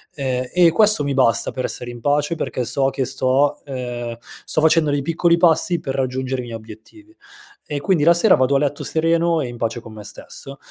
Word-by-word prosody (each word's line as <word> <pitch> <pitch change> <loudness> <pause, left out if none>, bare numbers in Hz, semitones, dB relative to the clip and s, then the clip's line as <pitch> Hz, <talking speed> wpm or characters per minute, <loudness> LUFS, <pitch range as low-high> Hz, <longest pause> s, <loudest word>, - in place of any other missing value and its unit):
ehm 130 -3 -2
e 175 -2 +4
questo 210 -4 +3
mi 140 -1 -1
basta 115 -3 +2
per 130 - -4
essere 120 0 -4
in 120 -1 -11
pace, 145 +4 +1
perché 155 -5 -3
so 135 +2 +2
che 135 -1 -2
sto, 135 +4 +1
ehm 120 -3 -5 0.3
sto 155 - -1
facendo 160 -1 +3
dei 145 -1 -1
piccoli 170 +2 +2
passi 170 0 +3
per 135 - -5
raggiungere 130 0 -2
i - - -8
miei 115 -1 -7
obiettivi. 115 - -14 0.5
E 145 - -4
quindi 160 +1 +1
la 170 +3 +6
sera 185 +3 +5
vado 130 +2 +1
a 135 - +4
letto 145 -1 -2
sereno 165 +1 +1
e 135 - -2
in 120 - -9
pace 115 0 -3
con 110 - -12
me 105 -1 -10
stesso, 135 +5 -8
140 Hz, 215 wpm, -20 LUFS, 125-165 Hz, 0.5 s, la